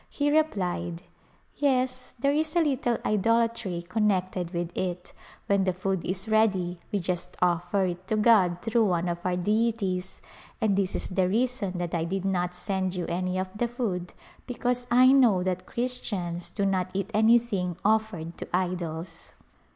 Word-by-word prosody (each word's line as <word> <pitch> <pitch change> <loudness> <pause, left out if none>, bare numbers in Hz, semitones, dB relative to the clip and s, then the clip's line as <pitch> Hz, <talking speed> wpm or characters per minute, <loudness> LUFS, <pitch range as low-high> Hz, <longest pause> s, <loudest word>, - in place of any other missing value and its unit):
He 290 +1 +1
replied, 180 - 0 0.2
" - - -36
Yes, 255 -2 0
there 275 +4 +2
is 310 +2 0
a 345 - +5
little 260 -5 0
idolatry 225 -3 +1
connected 185 -3 0
with 175 -1 -3
it; 180 -1 -3 0.3
when 200 -1 +2
the 185 -1 +1
food 185 0 -2
is 190 +4 -3
ready 195 -5 +2
we 205 - +1
just 180 0 -3
offer 175 +2 +1
it 180 +1 -4
to 215 - +1
God 205 -6 +4
through 225 0 +2
one 180 -2 +1
of 170 0 -2
our 180 -1 0
deities, 200 -1 0 0.4
and 215 -4 +2
this 195 -1 0
is - - -3
the 185 -1 +1
reason 225 -3 0
that 175 -1 -3
I 165 -1 0
did 190 +2 -3
not 180 -2 0
send 190 0 -2
you 180 -2 -2
any 180 +2 -1
of 185 0 -2
the 235 +3 0
food 205 -8 -3 0.3
be 250 - -5
cause 245 0 -1
I 255 +2 +6
know 235 -9 +5
that 185 0 -2
Christians 200 -8 -3
do 200 - -1
not 190 -2 0
eat 195 +2 -2
anything 215 -5 +3
offered 210 -6 0
to - - -5
idols." 175 -2 -3
190 Hz, 170 wpm, -27 LUFS, 180-230 Hz, 0.4 s, I